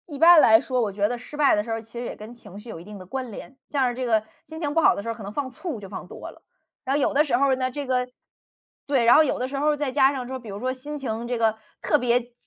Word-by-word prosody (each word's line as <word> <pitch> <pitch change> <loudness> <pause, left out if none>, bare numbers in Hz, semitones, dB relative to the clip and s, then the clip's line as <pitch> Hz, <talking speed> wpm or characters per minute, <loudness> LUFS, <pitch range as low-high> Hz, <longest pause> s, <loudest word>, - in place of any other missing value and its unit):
一 290 - -7
般 335 0 +8
来 220 0 +7
说 255 +1 -1
我 215 -3 -1
觉 200 +1 0
得 245 +2 -3
失 250 +5 -11
败 290 -2 +4
的 210 - 0
时 230 - -7
候 225 - -1
其 225 +2 -10
实 245 - -4
也 - - -5
跟 215 +3 -10
情 205 -5 -12
绪 230 +3 -12
有 165 - -7
一 - - -11
定 210 +2 -10
的 185 - -11
关 255 +4 -5
联。 260 +6 -10
像 275 -3 +1
是 - - -3
这 255 0 -3
个 220 -3 +2 0.2
心 320 0 -9
情 295 -3 -2
不 330 - +3
好 - - +5
的 - - -4
时 - - -8
候 - - -1
可 220 - -10
能 200 - -6
放 270 +3 -3
醋 275 - -6
就 200 - -9
放 195 - -8
多 - - -9
了。 - - -20 0.4
然 270 0 0
后 290 - +1
有 - - +1
的 290 +2 +4
时 275 -5 +1
候 270 0 +3
呢 255 0 -2
这 285 +1 -5
个 250 -1 0 0.8
对， 270 -5 +2
然 240 - +7
后 315 - +7
有 295 - -1
的 255 - -1
时 275 +1 -5
候 295 +1 +1
再 290 -2 -2
加 270 0 +4
上 260 -3 -5
说 260 +1 -4
比 235 -3 -11
如 200 0 -6
说 255 +3 -1
心 290 +3 -7
情 230 -3 -4
这 245 0 -2
个 225 -1 +2 0.3
特 300 - +2
别 245 0 0
250 Hz, 345 characters per minute, -24 LUFS, 225-280 Hz, 0.8 s, 般